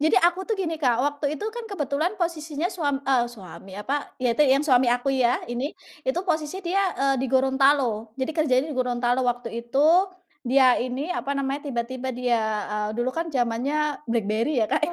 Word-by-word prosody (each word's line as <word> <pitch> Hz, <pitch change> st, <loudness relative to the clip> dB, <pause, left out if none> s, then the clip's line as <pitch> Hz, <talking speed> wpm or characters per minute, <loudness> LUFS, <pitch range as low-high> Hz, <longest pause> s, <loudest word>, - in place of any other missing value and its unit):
Jadi 315 Hz, +6 st, +3 dB
aku 355 Hz, +2 st, +1 dB
tuh 445 Hz, -, 0 dB
gini 325 Hz, -4 st, -3 dB
Kak, 245 Hz, -4 st, +3 dB
waktu 290 Hz, 0 st, -2 dB
itu 300 Hz, -, -6 dB
kan 475 Hz, -1 st, -6 dB
kebetulan 320 Hz, +1 st, -1 dB
posisinya 325 Hz, -2 st, -2 dB
suam 285 Hz, -6 st, -2 dB
eee, 255 Hz, -3 st, +3 dB
suami, 195 Hz, -3 st, -12 dB
apa, 280 Hz, +7 st, -3 dB
ya 250 Hz, -3 st, +1 dB
itu 265 Hz, -, -2 dB
yang 275 Hz, +3 st, +3 dB
suami 255 Hz, -4 st, +4 dB
aku 245 Hz, +3 st, +1 dB
ya 250 Hz, -2 st, +2 dB
ini, 245 Hz, +5 st, -4 dB, 0.3 s
itu 430 Hz, -8 st, +1 dB
posisi 330 Hz, +2 st, -2 dB
dia, 375 Hz, +3 st, +1 dB, 0.2 s
eee, 275 Hz, 0 st, +2 dB
di 265 Hz, -, 0 dB
Gorontalo, 265 Hz, -4 st, +2 dB
jadi 265 Hz, +4 st, -2 dB
kerjanya 280 Hz, -4 st, +2 dB
di 260 Hz, -, -7 dB
Gorontalo 245 Hz, 0 st, +1 dB
waktu 245 Hz, -1 st, -1 dB
itu. 270 Hz, +6 st, +2 dB, 0.5 s
Dia 260 Hz, 0 st, +5 dB
ini 260 Hz, +8 st, -2 dB
apa 280 Hz, -2 st, -2 dB
namanya, 275 Hz, +1 st, -1 dB
tiba-tiba 255 Hz, +1 st, -3 dB
dia, 245 Hz, -2 st, +1 dB, 0.3 s
eee, 210 Hz, 0 st, -1 dB
dulu 240 Hz, +2 st, 0 dB
kan 330 Hz, +1 st, -3 dB
zamannya 280 Hz, +3 st, 0 dB
BlackBerry 230 Hz, +4 st, 0 dB
ya -, -, -2 dB
Kak -, -, +2 dB
ya. -, -, -4 dB
270 Hz, 190 wpm, -25 LUFS, 245-305 Hz, 0.5 s, Dia